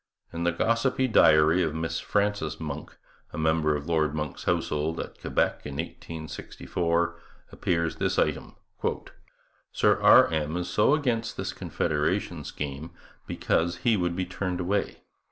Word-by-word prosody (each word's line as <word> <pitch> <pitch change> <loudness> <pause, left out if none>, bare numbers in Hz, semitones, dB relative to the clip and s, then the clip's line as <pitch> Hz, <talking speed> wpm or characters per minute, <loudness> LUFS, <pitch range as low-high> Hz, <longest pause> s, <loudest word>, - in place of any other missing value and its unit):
In 85 +1 -3
the 85 - +3
gossipy 115 +8 +1
diary 80 -6 +5
of 80 -3 -1
Miss 80 0 -2
Frances 100 -6 -1
Monck, 75 -2 -6 0.4
a - - -6
member 80 -1 +2
of 75 0 -4
Lord 80 -2 +1
Monck's 75 -2 -4
household 80 -2 0
at - - -7
Quebec - - 0
in 70 -1 -6
1864, 85 +1 -3 0.3
appears 85 -2 -1
this - - 0
item: - - 0 1.2
'Sir - - +2
R. - - +8
M. 80 +1 -1
is 90 0 -3
so 105 +7 +4
against 120 -6 -1
this - - -3
confederation 75 -1 -1
scheme 75 +2 -5 0.4
because 85 +1 0
he 115 -2 +5
would 90 -3 -1
be 95 0 -1
turned 90 0 -3
away. 95 +3 -2
85 Hz, 140 wpm, -27 LUFS, 75-90 Hz, 1.2 s, R